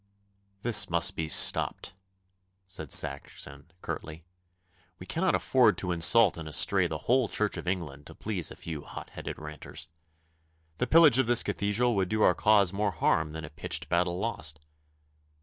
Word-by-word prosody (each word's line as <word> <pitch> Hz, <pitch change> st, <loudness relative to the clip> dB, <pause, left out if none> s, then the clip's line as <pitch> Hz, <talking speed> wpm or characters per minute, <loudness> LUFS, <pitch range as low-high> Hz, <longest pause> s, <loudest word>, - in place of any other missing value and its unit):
'This 120 Hz, -2 st, +4 dB
must 85 Hz, -1 st, +1 dB
be 80 Hz, -, -3 dB
stopped,' -, -, +2 dB, 0.7 s
said 95 Hz, -7 st, -8 dB
Saxon 70 Hz, +1 st, -2 dB
curtly. 80 Hz, +2 st, -7 dB, 0.7 s
'We 90 Hz, -, -11 dB
cannot 180 Hz, -, 0 dB
afford 120 Hz, -8 st, +2 dB
to 90 Hz, -1 st, -3 dB
insult 90 Hz, +3 st, +4 dB
and 80 Hz, -1 st, -7 dB
estray 75 Hz, -, +3 dB
the -, -, -5 dB
whole 125 Hz, 0 st, +2 dB
Church 105 Hz, -1 st, -1 dB
of -, -, -8 dB
England 75 Hz, -6 st, -4 dB
to -, -, -11 dB
please 95 Hz, -7 st, -5 dB
a -, -, -11 dB
few 80 Hz, -3 st, -7 dB
hot -, -, -10 dB
headed -, -, -7 dB
ranters. 75 Hz, +2 st, -9 dB, 0.9 s
The 125 Hz, -, 0 dB
pillage 155 Hz, -4 st, +6 dB
of 130 Hz, -, +2 dB
this 120 Hz, -1 st, +4 dB
Cathedral 105 Hz, +4 st, 0 dB
would 95 Hz, -2 st, -1 dB
do 110 Hz, 0 st, 0 dB
our -, -, +5 dB
cause 100 Hz, -4 st, +3 dB
more 105 Hz, +1 st, 0 dB
harm 80 Hz, -3 st, 0 dB
than 80 Hz, 0 st, -7 dB
a 75 Hz, -, -12 dB
pitched -, -, -3 dB
battle 85 Hz, 0 st, 0 dB
lost. 80 Hz, -8 st, -4 dB
90 Hz, 165 wpm, -28 LUFS, 80-110 Hz, 0.9 s, pillage